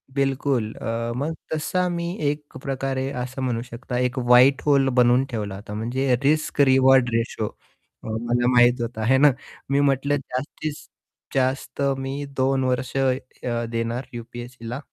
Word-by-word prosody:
बिलकुल 135 -4 0
अ, 115 +1 -3
मग 155 +5 -2 0.2
तसा 180 +4 0
मी 170 0 -2 0.2
एक 145 -2 -6
प्रकारे 135 0 -2
असं 130 +2 -5
म्हणू 120 -3 -1
शकता 125 +1 -6
एक 125 +1 0
व्हाईट 125 +2 +5
होल 140 -2 +4
बनवून 125 +2 +4
ठेवला 105 -5 -4
होता 105 +1 -9
म्हणजे 125 +4 0
रिस्क 155 0 +2
रिवॉर्ड 130 -2 +5
रेशिओ 115 -2 -1
अ, - - -16
मला 120 +2 0
माहीत 120 0 +5
होता, 115 -2 -3
हे 130 +2 +4
ना. 145 0 +6 0.4
मी 140 +1 +2
म्हंटलं 140 0 +2
जास्तीत 145 +3 -5 0.6
जास्त 135 +1 -1 0.2
मी 135 +2 -4
2 130 0 +2
वर्ष 130 0 -1
अ, 125 -2 -1
देणार 115 +2 -2
यु-पी-एस-सीला. 120 +1 -7
130 Hz, 145 wpm, -23 LUFS, 120-135 Hz, 0.6 s, ना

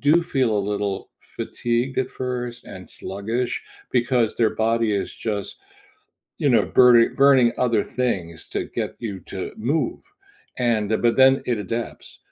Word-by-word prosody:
do 155 +4 +4
feel 130 -10 0
a - - +2
little 100 -1 -3
fatigued, 120 +2 -3
at 130 - -1
first, 125 -2 -5
and - - -10
sluggish 115 +6 -3 0.3
because 120 -2 +1
their 115 -2 +3
body 115 0 +1
is 100 - -2
just, 105 -3 -4 0.8
you - - +1
know, - - +4
burning 120 -2 +5
burning 135 -4 +5
other 115 -4 +2
things 90 -10 -3
to - - -2
get - - -4
you 105 -5 -5
to 95 - -5
move, 150 - -1 0.6
and 115 -4 +1
but 120 -1 +3
then 135 0 +5
it 120 -3 0
adapts. 115 +4 -6
120 Hz, 145 wpm, -23 LUFS, 105-125 Hz, 0.8 s, burning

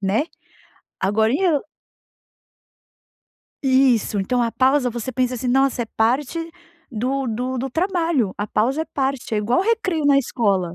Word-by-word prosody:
né. 205 +8 +1 0.8
Agora 220 +4 +2
e 275 - +1 0.2
o 285 - +1 2.0
Isso. 260 -6 +3
Então, 245 +6 0
a 230 - 0
pausa, 260 +1 +2
você 240 +2 -5
pensa 255 -1 0
assim: 250 +1 -4
"Nossa, 265 -1 +2
é - - -6
parte 280 +8 0 0.4
do 260 +4 -2
do 250 +4 -2
do 265 +1 -3
trabalho". 330 - 0
A 205 - -2
pausa 265 +10 0
é - - -6
parte, 270 -6 -2
é - - +1
igual 235 - +1
o - - +1
recreio 385 -8 0
na 280 -1 +5
escola, 195 -9 0
255 Hz, 155 wpm, -21 LUFS, 225-280 Hz, 2.0 s, na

